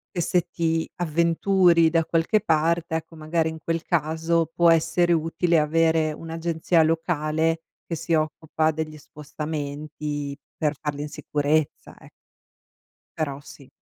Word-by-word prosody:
che, 175 - 0
se 180 +1 +1
ti 165 -1 -1
avventuri 170 +1 +3
da 165 -1 +1
qualche 170 +6 +2
parte, 165 -1 +1
ecco, 160 +1 -5
magari, 160 +1 0
in 160 0 -7
quel 165 -1 -2
caso 160 +1 +1
può 170 -1 +5
essere 175 +2 +2
utile 165 +1 +2
avere 160 0 +2
un'agenzia 165 +1 0
locale 160 0 0 0.2
che 165 - -3
si 165 +1 -3
occupa 155 0 0
degli 155 0 -5
spostamenti 150 -1 -5 0.2
per 150 -1 0
farli 145 -1 -3
in 150 - -5
sicurezza, 150 +1 -1
ec - - -16 1.1
Però 140 -3 -2
sì. 140 -2 -14
160 Hz, 130 wpm, -24 LUFS, 155-165 Hz, 1.1 s, può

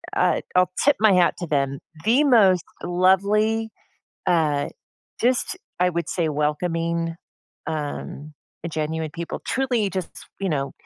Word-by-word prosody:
uh, - - +2
I'll 180 -1 +4 0.2
tip 290 - +5
my 215 -2 +5
hat 180 -1 +4
to 175 - -4
them. 140 -2 0 0.3
The 250 +7 +4
most 200 - +5 0.2
lovely, 200 +5 +2 0.6
uh, 150 -4 +2 0.5
just, 255 +9 +1 0.2
I 180 - +4
would 170 0 -3
say, 170 -3 0
welcoming, 165 +3 -1 0.5
um, 150 -1 -5 0.3
a 170 - -2
genuine 155 0 -3
people. 170 0 -5
Truly 245 -6 0
just, 185 -1 -6
you 195 - -1
know, 140 -3 -1
175 Hz, 135 wpm, -23 LUFS, 155-205 Hz, 0.6 s, tip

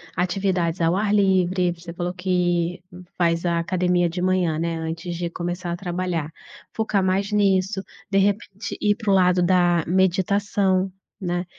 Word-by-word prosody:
atividades 180 -2 0
ao 165 +1 +3
ar 205 +1 +1
livre, 185 -3 +2
você 170 0 -10
falou 175 +1 -3
que 180 -1 0 0.4
faz 170 -1 +1
a 170 -1 +1
academia 180 0 +1
de 175 +2 -4
manhã, 180 -3 +1
né, 165 +1 -2
antes 165 +2 -4
de 170 0 -3
começar 175 +1 -4
a - - -1
trabalhar, 175 -4 -3 0.4
focar 215 -3 0
mais 190 +2 0
nisso. 195 -1 +1 0.3
De 195 - +1
repente, 200 +1 -1
ir 205 -1 +3
para 215 -2 -1
o - - +5
lado 180 -1 +4
da 175 -2 +3
meditação, 190 +1 +1 0.3
né, 175 -1 -2
180 Hz, 155 wpm, -23 LUFS, 175-190 Hz, 0.4 s, o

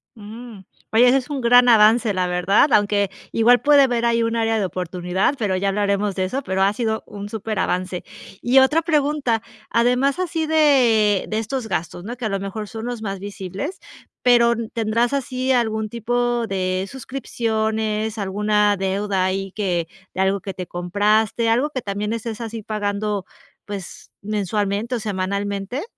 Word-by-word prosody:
Mm, 220 0 -10 0.3
oye, 240 +3 +6
ese 260 +2 +5
es 260 +2 -4
un 285 -3 -3
gran 245 +1 +6
avance, 220 0 +5
la 185 -1 0
verdad, 185 +9 +3
aunque 205 -1 +2 0.2
igual 240 +2 +4
puede 285 -1 +6
haber 240 -2 +1
ahí 235 0 +2
un 230 0 -1
área 225 -1 +1
de 205 - 0
oportunidad, 180 - -1
pero 205 -5 0
ya 195 +2 0
hablaremos 200 0 0
de 190 - 0
eso, 260 +9 -3
pero 190 -7 0
ha 200 +1 +3
sido 220 -1 -2
un 205 0 -8
superavance. 190 -4 -2 0.4
Y 250 +2 +2
otra 300 +5 +4
pregunta, 295 -7 +1 0.3
además 250 +5 +2
así 330 -3 -2
de 245 -10 +4
de 215 - -2
estos 225 +2 -3
gastos, 175 -2 -3
no 235 +5 -6
que 245 - -5
a - - 0
lo 195 -1 -1
mejor 200 +2 -5
son 225 +1 -7
los 240 -2 -5
más 195 -2 -4
visibles, 200 - -6 0.5
pero 235 -1 +5 0.2
¿tendrás 230 +2 0
así 260 -1 -1
algún 220 -3 +1
tipo 240 +1 -1
de 185 -1 -1
suscripciones, 220 -4 -2
alguna 210 +1 +1
deuda 195 0 -1
ahí 190 +1 -2
que 180 -5 -1 0.3
de 190 - 0
algo 195 +1 +2
que 195 - -6
te 180 - -5
compraste, 210 +6 +1
algo 250 +6 +2
que 260 -4 -4
también 205 +1 -3
estés 230 0 -5
así 225 -1 -6
pagando, 205 -1 -2 0.4
pues, 200 -3 -8
mensualmente 210 +2 -1
o 235 - -2
semanalmente? 200 - -3
215 Hz, 165 wpm, -21 LUFS, 195-240 Hz, 0.5 s, oye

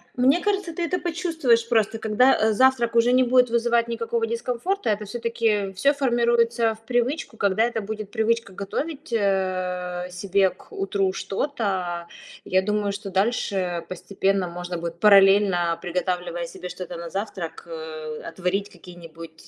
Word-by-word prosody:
мне 265 +6 +4
кажется, 395 -3 -1
ты 345 - -3
это 360 +2 0
почувствуешь 325 -10 +1
просто. 225 -1 +1
Когда, 225 +5 +4
э, 220 0 +2
завтрак 240 0 +3
уже 235 +1 +4
не 255 +1 +5
будет 250 0 +4
вызывать 235 0 +2
никакого 230 0 -1
дискомфорта, 250 - -2
это 210 0 -1
всё-таки 220 -2 -1
всё 275 +10 +3
формируется 235 -3 +2
в 220 - -21
привычку. 245 0 -1
Когда 200 +2 +2
это 235 -1 -1
будет 215 0 -6
привычка 225 -1 0
готовить, 285 - -5
э, 185 -3 -1
себе 190 +1 +2
к - - -19
утру 195 -1 -1
что-то, 190 -8 -2 0.4
я 185 0 +2
думаю, 210 0 0
что 200 0 -6
дальше 190 -4 0
постепенно 195 +1 -1
можно 175 +1 -5
будет, 170 0 -6
параллельно 195 -4 +5
приготавливая 175 -1 -2
себе 180 +1 -8
что-то 180 0 -7
на 170 0 -7
завтрак, 190 -5 -5
э, 155 -2 -7
отварить 185 +4 -2
какие-нибудь 165 -2 -13
205 Hz, 145 wpm, -24 LUFS, 180-235 Hz, 0.4 s, не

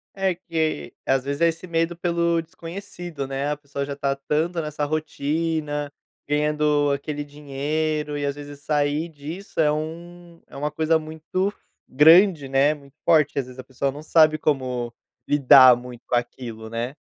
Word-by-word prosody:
É 195 -1 +1
que, 165 -3 -2
às 135 -1 +2
vezes, 140 +2 -4
é 170 - +6
esse 165 +3 -6
medo 165 0 0
pelo 170 -1 +1
desconhecido, 170 -3 -7
né, 135 +2 -2
a 150 - -2
pessoa 140 -1 -5
já 140 - -5
está 140 -1 -1
tanto 155 +5 -1
nessa 150 -1 -4
rotina, 150 0 -2 0.4
ganhando 150 0 +2
aquele 145 +1 -3
dinheiro, 150 +1 -3
e 145 - -2
às 140 0 -1
vezes 145 -1 -10
sair 150 +2 0
disso 160 +6 -8
é 150 -2 +4
um 170 +2 -6
é - - -12
uma 150 +2 -2
coisa 160 +1 +2
muito 160 +5 -3 0.3
grande, 160 +1 +6
né, 140 +3 +3
muito 140 -1 -16
forte 150 -4 +4
que, - - -1
às 135 - -2
vezes, 125 0 -13
a - - -6
pessoa 130 +1 -2
não 145 +2 -9
sabe 155 0 +4
como 130 -5 -1 0.4
lidar 130 -3 +8
muito 120 0 -10
com - - +1
aquilo, 120 -2 -4
né. 115 +3 -3
150 Hz, 170 wpm, -23 LUFS, 140-160 Hz, 0.4 s, lidar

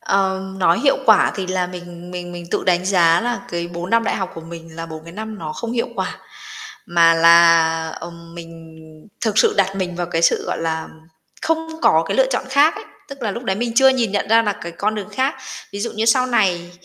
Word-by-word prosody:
Ờ, 190 -1 0 0.2
nói 175 0 +3
hiệu 275 +1 +3
quả 220 -2 +5
thì 190 -2 -3
là 185 -1 -1
mình 175 -1 -10
mình 175 -1 -7
mình 175 0 -8
tự - - -1
đánh 180 -1 +2
giá 175 -3 +4
là 240 0 -2
cái 170 0 -3
4 175 +1 -6
năm 230 0 +3
đại - - -1
học 190 -2 -3
của 165 - -8
mình 165 0 -11
là 165 0 -6
4 160 -1 -9
cái 170 - -11
năm 215 +2 -7
nó 155 -3 -5
không 230 +8 -5
hiệu 235 -1 -1
quả. - - -4 0.7
Mà 170 -1 +4
là, 165 -1 +5
ờm, 170 0 -10
mình 165 -1 -12 0.4
thực 215 -2 0
sự - - +4
đặt 195 -1 +1
mình 180 -2 -3
vào 175 0 -2
cái 165 -1 -2
sự, - - +3
gọi - - -3
là, 160 -1 -3 0.5
không 325 0 -1
có - - +4
cái - - -1
lựa - - +4
chọn - - -1
khác 285 +4 +4
ấy, 425 +1 -9 0.2
tức 275 -2 -10
là 220 - -1
lúc 235 +5 -6
đấy 190 -4 -1
mình 235 +2 -2
chưa 265 +2 +6
nhìn 245 -6 +1
nhận 205 0 -1
ra 225 +1 +5
là 210 -2 0
cái 170 -3 -9
con 210 +5 -1
đường 205 -3 -5
khác. 270 +3 0 0.4
Ví 200 - -5
dụ 235 - -3
như 220 +1 -1
sau 255 +3 +3
này 185 -8 +1
185 Hz, 240 wpm, -20 LUFS, 170-225 Hz, 0.7 s, chưa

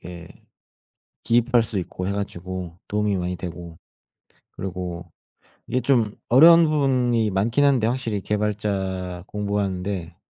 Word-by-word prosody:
이게 85 0 -10 0.9
기입할 120 0 +3
수 110 -3 -4
있고 90 +1 -5
해 100 - -1
가지고 90 -3 -5
도움이 105 -1 0
많이 90 0 -2
되고 85 -1 -8 0.7
그리고 90 -2 -6 0.6
이게 130 - 0
좀 115 -4 +1
어려운 165 +7 +8
부분이 125 -7 +1
많긴 115 +8 +1
한데 135 -6 +3
확실히 115 -3 -1
개발자 95 -4 -2
공부하는데 100 -4 -3
100 Hz, 270 characters per minute, -23 LUFS, 90-115 Hz, 0.9 s, 어려운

